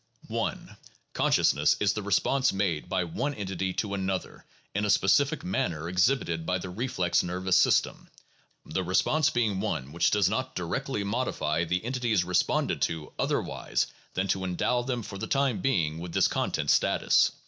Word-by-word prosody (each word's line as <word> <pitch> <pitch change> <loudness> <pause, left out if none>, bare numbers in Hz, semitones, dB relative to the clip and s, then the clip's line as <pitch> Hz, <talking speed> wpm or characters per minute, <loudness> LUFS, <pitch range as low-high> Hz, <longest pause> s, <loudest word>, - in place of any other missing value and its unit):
1. - - -3 0.4
Consciousness - - +3
is - - +2
the - - -3
response 135 0 +2
made 95 -6 -1
by 95 -1 +1
one 125 - -3
entity 95 -3 -3
to 100 +2 -3
another 95 -1 -3 0.3
in 105 - -1
a 105 - 0
specific 135 - +3
manner 85 -3 -2
exhibited 90 -2 +1
by 90 +2 0
the 90 0 -7
reflex 90 -4 0
nervous 90 +1 -1
system - - +2 0.3
— - - -39
the 95 +4 -2
re 90 +1 -2
sponse 155 -1 +3
being 110 -5 0
one 75 -10 -3
which 85 - +2
does 105 -3 +3
not 130 +6 -2
directly 90 +3 -2
modify 100 -8 -1
the 90 +5 -1
entities 120 -6 +1
re 90 +1 -6
sponded 90 - +1
to 80 -2 -2
otherwise - - -1 0.3
than 95 +1 0
to 95 -1 0
endow 95 +7 0
them 120 -2 -3
for 100 -1 -8
the 110 - -4
time 135 -7 +1
being 80 - 0
with 85 0 -7
this - - +4
content - - 0
status. - - +3
95 Hz, 170 wpm, -28 LUFS, 90-120 Hz, 0.4 s, this